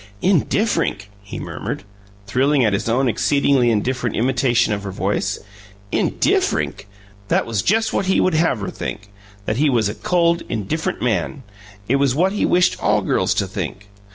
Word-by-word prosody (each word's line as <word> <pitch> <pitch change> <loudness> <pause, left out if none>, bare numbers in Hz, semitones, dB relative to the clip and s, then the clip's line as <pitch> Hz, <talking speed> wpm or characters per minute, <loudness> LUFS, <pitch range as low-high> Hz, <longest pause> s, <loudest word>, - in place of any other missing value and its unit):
"'Indifferink'!" 185 - +1
he 105 - -8
murmured, - - -5 0.4
thrilling 130 +5 +2
at 105 - +2
his 100 - -1
own 130 +3 +2
exceedingly 135 +1 +2
indifferent 120 +1 -1
imitation 120 -2 +2
of 100 - -3
her 100 - -6
voice. 95 0 -1 0.5
"Indifferink!" - - 0 0.4
that - - +1
was 115 -4 -1
just 225 - +1
what 195 - 0
he 190 - +3
would 185 - +2
have 155 -8 +1
her 100 - -4
think 100 0 -6 0.4
that 110 - -1
he 150 +2 +3
was 115 -5 +2
a - - -3
cold, 170 +4 +1
indifferent 115 +9 -2
man. 120 - -1 0.4
It 135 - +2
was 135 -2 +2
what 185 +5 +2
he 210 - 0
wished 180 0 +2
all - - +2
girls - - +1
to - - +1
think. 100 +1 -6
125 Hz, 165 wpm, -20 LUFS, 105-155 Hz, 0.5 s, he